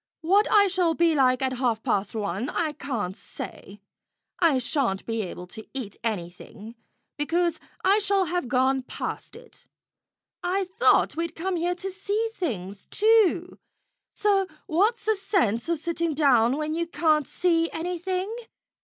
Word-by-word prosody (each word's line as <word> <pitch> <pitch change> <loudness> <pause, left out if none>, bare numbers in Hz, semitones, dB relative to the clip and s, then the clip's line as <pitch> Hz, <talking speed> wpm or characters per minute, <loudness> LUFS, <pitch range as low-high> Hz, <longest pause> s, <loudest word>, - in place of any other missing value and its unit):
What 390 +6 +3
I 415 -2 +7
shall 360 -4 +1
be 335 -1 +3
like 255 -3 +3
at 260 0 0
half 235 -4 0
past 195 +1 -1
one 205 +4 -2
I 320 -2 -1
can't 240 -11 -4
say. 200 0 -8 0.6
I 325 -6 +4
shan't 250 -6 -1
be 225 -1 -2
able 180 -2 -6
to 220 - -8
eat 230 -7 -4
anything, 205 +1 -5 0.4
because 335 +3 0 0.2
I 395 +3 +4
shall 395 -2 +2
have 350 -4 -2
gone 260 +2 +2
past 255 - -6
it. 475 +1 -15 0.7
I 370 +2 0
thought 370 0 +3
we'd 335 +1 -3
come 370 +3 -2
here 350 +1 0
to 385 +2 -5
see 410 +4 -2
things, 200 - -4
too, 415 -5 +3 0.6
so 395 -2 +2 0.2
what's 415 +9 +1
the 440 - +2
sense 335 - 0
of 335 - +1
sitting 335 0 -2
down 260 -4 +4
where 305 - -2
you 330 +2 -2
can't 310 -4 +2
see 330 -2 +1
anything? 365 +4 -3
330 Hz, 150 wpm, -26 LUFS, 245-370 Hz, 0.7 s, I